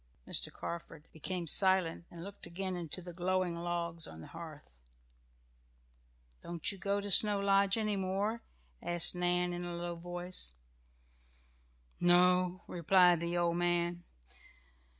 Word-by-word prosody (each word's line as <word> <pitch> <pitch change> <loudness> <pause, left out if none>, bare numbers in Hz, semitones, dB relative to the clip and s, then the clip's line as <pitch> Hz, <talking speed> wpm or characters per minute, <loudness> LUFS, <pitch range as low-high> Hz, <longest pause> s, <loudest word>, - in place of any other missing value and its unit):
Mr. - - +2
Carford 165 -2 -7
became 175 +3 -4
silent 185 -1 +2
and 170 -1 -10
looked 200 -2 -8
again 185 +2 -3
into 175 +1 -3
the 175 0 -8
glowing 180 0 0
logs 170 -1 -2
on 80 - -11
the 80 - -11
hearth. 155 - -11 1.7
"Don't 170 +1 -2
you 195 - -10
go 200 +2 0
to 200 0 -3
Snow 205 0 +8
Lodge 200 +1 +3
any 215 -2 0
more?" 200 +4 -2 0.4
asked 175 -1 +1
Nan 180 0 0
in 175 0 -4
a 175 0 -5
low 175 0 -4
voice. 175 - -4 1.4
"No," 180 +1 +3
replied 180 0 +4
the 170 +1 -2
old 170 0 +1
man. 175 0 0
175 Hz, 130 wpm, -33 LUFS, 170-185 Hz, 1.7 s, Snow